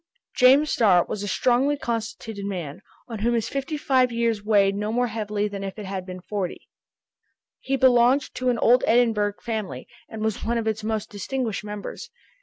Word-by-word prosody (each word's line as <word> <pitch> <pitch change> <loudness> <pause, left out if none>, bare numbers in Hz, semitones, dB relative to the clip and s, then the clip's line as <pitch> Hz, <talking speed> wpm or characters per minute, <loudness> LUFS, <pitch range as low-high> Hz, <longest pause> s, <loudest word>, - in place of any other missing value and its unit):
James 275 +4 +5
Starr 185 -6 +4
was 205 - -5
a 205 - -4
strongly 260 +7 +2
constituted 225 -4 -4
man, 180 -4 -5 0.3
on 230 -4 -6
whom 235 +3 +1
his 230 - -1
fifty 275 +3 -3
five 260 -3 +2
years 230 -3 0
weighed 200 -2 +3
no 210 +2 -2
more 245 +2 +1
heavily 210 -2 -2
than 200 -1 -6
if 195 -1 -5
they 215 - -7
had 190 -1 -5
been 185 0 -7
forty. 190 -2 -5 0.9
He 270 - -1
belonged 260 +1 +4
to 255 0 -1
an 245 - +1
old 245 +3 +4
Edinburgh 220 -4 +2
family, 215 - -4 0.2
and 220 -1 -6
was 220 -2 -2
one 235 +1 0
of 230 - -2
its 220 -1 -2
most 220 -1 -3
distinguished 225 +1 -3
members. 210 - -7
220 Hz, 185 wpm, -24 LUFS, 205-245 Hz, 0.9 s, James